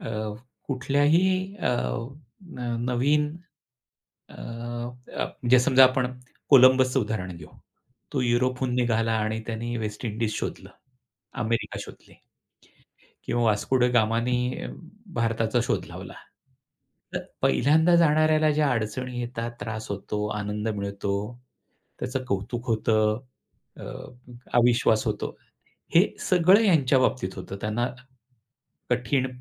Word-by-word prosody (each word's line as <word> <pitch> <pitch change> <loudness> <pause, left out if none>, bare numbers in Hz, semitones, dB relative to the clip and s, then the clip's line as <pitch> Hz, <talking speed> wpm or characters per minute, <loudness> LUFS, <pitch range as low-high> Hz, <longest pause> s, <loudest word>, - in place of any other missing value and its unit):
अ, - - -6 0.6
कुठल्याही 165 +9 +2
अ, 200 - 0 0.7
न 125 -9 -5
नवीन 140 +5 +2 1.0
अ, - - -15
प 120 +1 -7
म्हणजे 125 +1 +2
समजा 130 +1 +6
आपण 130 0 +2 0.4
कोलंबसचं 130 -1 +6
उदाहरण 100 -5 -3
घेऊ. 80 -3 -11 0.6
तो 140 - 0
युरोपहून 125 +1 +1
निघाला 115 -2 +1
आणि 110 +1 -1
त्याने 115 +1 -3
वेस्ट 105 +1 -5
इंडीज 110 0 -2
शोधलं, - - -5 0.7
अमेरिका 115 +1 -2
शोधली. - - -14 1.1
किंवा 120 - 0
वास्को 110 +4 +2
द 125 - +4
गामा 115 -1 +3
ने 125 +1 -1 0.5
भारताचा 115 0 +1
शोध - - -1
लावला. - - -9 1.0
तर - - -3 0.2
पहिल्यांदा 160 +5 +4
जाणाऱ्याला 155 -1 +4
ज्या 150 -1 +2
अडचणी 120 +2 -3
येतात, 120 -1 -4
त्रास 110 -1 -5
होतो, 105 +1 -3
आनंद 105 +1 -3
मिळतो, 100 -1 -3 0.9
त्याचं 130 +1 -3
कौतुक 115 +2 -3
होतं, 110 -1 +2 0.6
अ, - - -8 0.7
अविश्वास 120 -2 +3
होतो. - - -2 0.6
हे - - +7 0.2
सगळं 185 +4 +5
त्यांच्या 145 -9 +4
बाबतीत 120 -7 0
होतं 100 - -7
त्यांना, 110 +3 0 1.0
कठीण 125 +2 +1
120 Hz, 110 wpm, -26 LUFS, 110-130 Hz, 1.1 s, हे